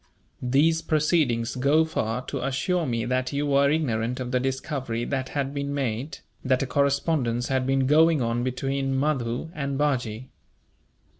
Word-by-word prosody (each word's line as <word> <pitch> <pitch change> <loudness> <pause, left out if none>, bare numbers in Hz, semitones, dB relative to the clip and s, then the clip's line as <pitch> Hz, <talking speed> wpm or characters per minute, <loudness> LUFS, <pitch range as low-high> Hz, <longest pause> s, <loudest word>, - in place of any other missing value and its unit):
These 150 +6 +3
proceedings 150 -7 +1
go 140 +5 +3
far 125 -6 -2
to - - -4
assure 155 +5 0
me 115 -2 -1
that 130 +1 -1
you 145 +1 0
were 140 0 +3
ignorant 125 -6 0
of 125 -1 -4
the 125 - +2
discovery 130 -2 -3
that 130 -2 -2
had 140 -1 -2
been 140 0 -3
made, 130 +1 -2 0.3
that 130 0 +2
a - - -1
correspondence 140 -3 0
had 130 -1 0
been 135 0 +2
going 160 +3 +5
on 120 0 0
between 135 +1 -1
Mahdoo 130 -1 -1
and 140 -2 -3
Bajee. 130 -5 -1
135 Hz, 155 wpm, -25 LUFS, 125-145 Hz, 0.3 s, going